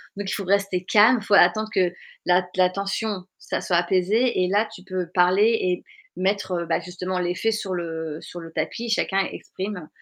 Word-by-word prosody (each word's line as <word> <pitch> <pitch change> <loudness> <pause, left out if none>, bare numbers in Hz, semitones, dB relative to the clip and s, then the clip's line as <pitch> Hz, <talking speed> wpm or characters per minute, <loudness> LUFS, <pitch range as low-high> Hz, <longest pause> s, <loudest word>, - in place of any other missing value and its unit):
Donc 200 -1 -4
il - - -2
faut 200 - -3
rester 195 -1 +1
calme, 220 +5 +5
faut 210 0 -2
attendre 215 +4 +4
que 185 -3 +2 0.3
la 180 +1 +4
t 180 - -15
la 185 -1 +4
tension, 195 +1 -3 0.2
ça - - -3
soit 175 - +1
apaisé 190 +5 +2
et - - +1
là 205 +4 +2
tu 185 -4 -12
peux 185 -2 -3
parler 195 +6 +4
et 180 -1 -1 0.3
mettre, 195 +1 0
heu, - - -7
bah, 165 - 0
justement, 180 +1 -4
les 175 0 0
faits 225 +3 0
sur 200 -3 -3
le 160 -3 -4
sur 175 - -9
le 165 0 -10
tapis, 235 +7 -3
chacun 195 -3 +1
exprime, 190 -4 -6
185 Hz, 205 wpm, -24 LUFS, 180-205 Hz, 0.3 s, calme